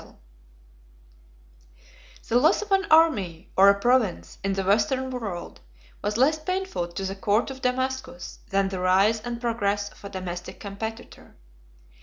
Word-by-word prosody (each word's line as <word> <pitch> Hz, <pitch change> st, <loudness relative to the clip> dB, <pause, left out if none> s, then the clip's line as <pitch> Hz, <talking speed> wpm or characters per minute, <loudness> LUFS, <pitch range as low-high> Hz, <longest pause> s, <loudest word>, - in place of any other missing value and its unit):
] -, -, -25 dB
The 240 Hz, -, +3 dB
loss 320 Hz, +10 st, +3 dB
of 420 Hz, -, -13 dB
an 390 Hz, 0 st, +3 dB
army, 205 Hz, -, +3 dB
or 195 Hz, +1 st, +7 dB
a 200 Hz, 0 st, +3 dB
province, 240 Hz, -4 st, +1 dB
in 195 Hz, 0 st, 0 dB
the 195 Hz, 0 st, -1 dB
Western 225 Hz, +7 st, +1 dB
world, 215 Hz, -9 st, -6 dB, 0.4 s
was 210 Hz, +1 st, -1 dB
less 300 Hz, +5 st, +3 dB
painful 370 Hz, -, -2 dB
to 175 Hz, +3 st, -5 dB
the 195 Hz, +1 st, -3 dB
court 205 Hz, +6 st, +1 dB
of 265 Hz, 0 st, -9 dB
Damascus, 260 Hz, +1 st, -3 dB
than 195 Hz, 0 st, +1 dB
the 190 Hz, -1 st, -4 dB
rise 195 Hz, +5 st, +3 dB
and 235 Hz, +1 st, -5 dB
progress 205 Hz, -4 st, -1 dB
of -, -, -20 dB
a 200 Hz, -, -6 dB
domestic 180 Hz, -2 st, -6 dB
competitor. 220 Hz, +3 st, -8 dB
200 Hz, 150 wpm, -25 LUFS, 175-250 Hz, 0.4 s, or